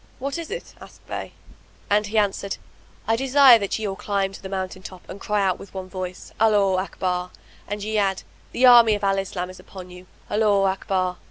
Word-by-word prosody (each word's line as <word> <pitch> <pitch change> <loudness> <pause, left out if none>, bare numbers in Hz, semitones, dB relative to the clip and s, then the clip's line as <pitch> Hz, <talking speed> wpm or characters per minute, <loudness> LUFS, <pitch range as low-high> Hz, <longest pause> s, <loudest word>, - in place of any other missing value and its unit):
"What 275 +4 -4
is 330 - -7
it?" 485 - -7
asked - - -15
they - - -6 0.5
and 210 +1 +2
he 220 +2 -3
answered, 200 -1 0 0.5
"I 225 - +3
desire 265 -1 +6
that 200 -2 -2
ye 220 -1 -3
all 195 - -3
climb 195 -1 -2
to - - -11
the 190 - -7
mountain 185 -1 -4
top 185 -1 -11
and 200 - -9
cry 210 -1 0
out 185 -2 0
with 195 - -13
one 185 -1 -6
voice, 185 -1 -7
'Allaho 205 -4 +3
Akbar!' 180 -1 -3 0.4
and 205 0 -4
ye 215 0 0
add, 195 -2 0 0.3
'The 255 - +3
army 235 -3 +8
of 205 - -7
Al 195 0 +2
Islam 185 -1 -4
is 185 - -14
upon 185 -2 -11
you! 180 0 -13 0.2
Allaho 205 -2 +2
Akbar!' 190 -1 -1
195 Hz, 205 wpm, -23 LUFS, 185-215 Hz, 0.5 s, army